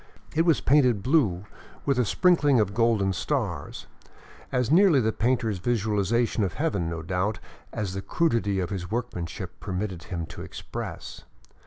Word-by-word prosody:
It 165 +2 +2
was 165 - +4
painted 125 -8 +3
blue, 115 - +2 0.4
with 140 -3 +1
a 125 - +3
sprinkling 145 - +3
of 100 -2 +1
golden 110 -4 +2
stars, 80 -3 -3 0.7
as 125 0 0
nearly 175 -3 +6
the 110 -2 +1
painter's 115 -4 0
vizualization 110 +1 +1
of 95 - -2
heaven, 100 - -1
no 85 -1 -5
doubt, 95 +4 -1 0.3
as 100 -3 -3
the 95 - -4
crudity 115 -9 0
of 90 0 -2
his 90 -3 -4
workmanship 110 -8 -4
permitted 95 -3 -4
him 85 -3 -4
to - - -10
express. - - -7
110 Hz, 150 wpm, -26 LUFS, 95-125 Hz, 0.7 s, nearly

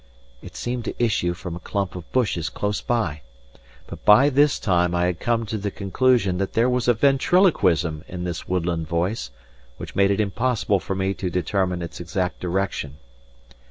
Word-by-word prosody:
It - - -12
seemed 120 -1 -3
to - - -4
issue 105 -7 +1
from 90 -1 -6
a - - -7
clump 95 +1 -3
of 90 -2 -9
bushes 100 -10 0
close 105 0 -2
by; 90 -12 -1 0.6
but - - -10
by 125 +8 +7
this 145 +1 +4
time 90 -2 +1
I 90 0 +2
had 90 -1 -1
come 115 -1 0
to 110 0 -4
the 100 +1 -2
conclusion 100 -1 +1
that 95 - -2
there 115 +2 +3
was 125 -1 0
a 120 - +4
ventriloquism 120 - +3
in 90 -1 -6
this 85 -2 -5
woodland 85 -3 -1
voice 85 - -1 0.5
which - - -8
made 100 0 +4
it 100 - +1
impossible 110 -1 +1
for 95 - -4
me 95 +1 0
to 95 -2 -3
determine 90 0 -1
its 85 - -7
exact 90 +1 -3
direction. 90 -6 -2
95 Hz, 180 wpm, -23 LUFS, 90-115 Hz, 0.6 s, by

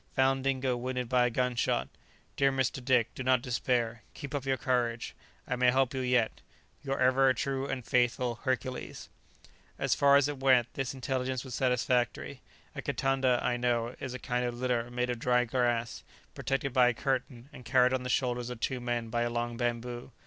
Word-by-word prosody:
Found 135 0 +2
Dingo 130 -2 +1
wounded 125 0 -3
by 125 0 +3
a - - 0
gun 125 +1 0
shot. 120 - 0 0.5
Dear 135 0 +3
Mr. 130 -1 -1
Dick, 125 -3 +2
do - - -7
not 130 -1 +2
despair; 120 -2 -1
keep 140 -2 -7
up 140 -2 -3
your 135 -1 +1
courage. 120 -2 -1 0.3
I 125 - -1
may 125 0 +4
help 130 +1 +2
you 135 - -2
yet. 125 -3 +1 0.4
"Your 135 -1 -2
ever 130 +1 +4
true 135 -1 -2
and 130 -4 -4
faithful 120 0 +1
"HERCULES." 130 -1 -3 0.7
As - - +1
far 140 0 +5
as 140 -1 +5
it 145 -2 -5
went, 130 -3 +3
this 135 -1 -3
intelligence 130 -1 -2
was 130 - -8
satisfactory. 125 -1 0 0.3
A - - -4
kitanda, 135 -2 +1
I 120 - +1
know, 120 -1 0
is 130 -2 -5
a - - -3
kind 125 -1 -2
of 120 -1 -3
litter 120 -1 -1
made 125 0 -1
of 120 - -4
dry 125 0 +2
grass, 120 -2 -1 0.3
protected 135 -1 -2
by 125 -2 +5
a 125 - +2
curtain, 130 -1 -2
and 125 - -11
carried 125 +1 +3
on 130 - 0
the 125 - -5
shoulders 125 -1 0
of 125 -2 -6
two 130 +2 -1
men 120 -1 -2
by 120 +1 -1
a 120 - +1
long 120 0 -2
bamboo. 120 0 -3
125 Hz, 195 wpm, -30 LUFS, 120-130 Hz, 0.7 s, far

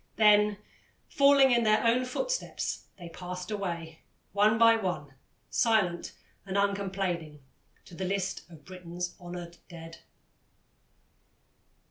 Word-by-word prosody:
Then, 210 -1 +5 0.5
falling 280 -1 +5
in 240 -1 +4
their 215 +1 +3
own 245 +2 +3
footsteps, - - -3
they 175 -2 -9
passed 180 +2 -7
away, 170 -6 -4 0.3
one 210 +2 +4
by 230 0 +6
one, 180 -10 -3 0.4
silent 205 -7 +1 0.3
and 195 0 -3
uncomplaining, 190 -7 -2 0.4
to - - -15
the 185 +2 -4
list 190 -1 -3
of 160 -4 -15
Britain's 180 -1 -6
honoured 175 -1 -8
dead. 165 -1 -10
190 Hz, 110 wpm, -29 LUFS, 175-215 Hz, 0.5 s, by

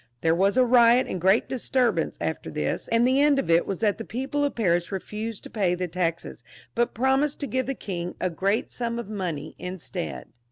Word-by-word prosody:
There 165 0 +3
wa^ 195 +6 +2
a 255 - +6
riot 240 0 +5
and 185 - -4
great 190 +5 +3
disturbance 255 -1 0
after - - -3
this, - - -2
and 230 +1 +3
the 265 +2 +3
end 290 -1 +4
of 270 -10 0
it 165 +1 +4
was 195 - -2
that 210 -1 +1
the - - -4
people 265 +6 -2
of 285 - -1
Paris 175 -5 +1
refused 210 +3 -5
to - - -10
pay 190 -5 +1
the 180 0 -3
taxes, 170 -1 -3 0.3
but 240 -1 0
promised 265 +4 +1
to - - -1
give 260 -2 -1
the 270 - -2
king 180 -5 -5
a 185 - -1
great 195 +6 0
sum 235 -1 -3
of 235 -3 -5
money 185 -8 -4
instead. 180 0 -6
215 Hz, 210 wpm, -25 LUFS, 180-250 Hz, 0.3 s, a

